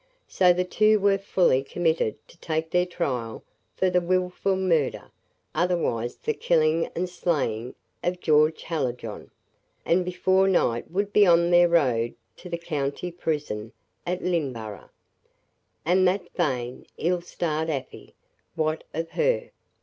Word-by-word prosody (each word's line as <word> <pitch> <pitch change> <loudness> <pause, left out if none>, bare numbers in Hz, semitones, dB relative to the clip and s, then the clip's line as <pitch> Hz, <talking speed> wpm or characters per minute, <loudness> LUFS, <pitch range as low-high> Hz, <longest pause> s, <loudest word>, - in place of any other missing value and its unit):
So 180 -1 +4
the 180 +1 +1
two 215 +3 +3
were 200 0 +3
fully 180 -8 +2
committed 160 -6 0
to - - -18
take 160 0 -2
their 180 0 +2
trial 125 -10 -3 0.3
for 185 -1 +1
the 180 - +3
"Wilful 185 +2 0
murder, 170 -7 0 0.4
otherwise 160 -10 0
the 455 - -2
killing 165 - +2
and 180 +2 -1
slaying 135 -10 -2 0.3
of 180 0 -1
George 155 -1 +3
Hallijohn;" 125 -9 -4 0.6
and 180 +2 +3
before 185 +2 +2
night 120 -11 +1
would 200 +3 -2
be 205 -2 +6
on 170 0 +4
their 175 0 +6
road 125 -9 +2 0.2
to 180 - -10
the 170 - -2
county 150 +1 -3
prison 150 -10 -3 0.3
at 180 +1 -3
Lynneborough. 130 - -3 1.0
And 185 +3 +4
that 190 +2 -1
vain, 125 -7 -2
ill 175 +1 0
starred 160 -2 -2
Afy! 135 -4 -6 0.4
What 155 0 -1
of 165 +1 -3
her? - - 0
170 Hz, 135 wpm, -25 LUFS, 145-180 Hz, 1.0 s, be